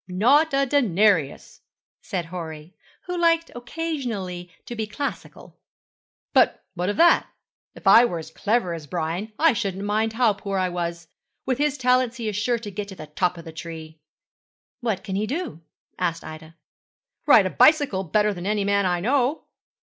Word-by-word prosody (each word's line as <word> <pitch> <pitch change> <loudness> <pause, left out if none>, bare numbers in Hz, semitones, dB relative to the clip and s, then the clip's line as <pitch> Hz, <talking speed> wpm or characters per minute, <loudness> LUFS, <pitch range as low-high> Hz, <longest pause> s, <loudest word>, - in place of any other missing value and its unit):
'Not 250 - +3
a 275 0 +2
denarius,' 210 - +1 0.4
said 180 -3 -4
Horry, 165 -1 -8 0.3
who 360 - -4
liked 335 -1 +2
occasionally 240 - -4 0.2
to 240 - -7
be 220 -1 -3
classical. 280 +7 -7 0.7
'But - - +3
what 180 +1 -2
of 205 - -2
that? 340 +1 +5 0.5
If - - -14
I 235 - +8
were 175 -8 -2
as 160 0 -8
clever 210 -1 0
as 160 -3 -8
Brian 175 +6 -3
I 325 -1 +4
shouldn't 200 -4 -3
mind 215 +2 0
how 230 -2 +3
poor 200 -1 -4
I 185 -1 +1
was. 170 -1 -4 0.4
With 260 -1 -1
his 295 -1 +1
talents 250 -1 +2
he 230 -2 -4
is 210 - -2
sure 235 +4 0
to 220 -3 -8
get 200 +1 -5
to 195 - -9
the 155 - -9
top 180 +4 -1
of 170 - -10
the 160 - -9
tree.' 160 -1 -9 0.8
'What 225 -6 -2
can 190 - -4
he 210 +2 -1
do?' 275 - -4 0.4
asked 170 -2 -1
Ida. 155 +1 -10 0.7
'Ride - - +7
a - - 0
bicycle 290 -12 +4
better 210 +4 +1
than 180 0 -6
any 210 -1 0
man 200 -1 +2
I 175 -1 0
know.' 265 - +1
205 Hz, 175 wpm, -24 LUFS, 175-245 Hz, 0.8 s, I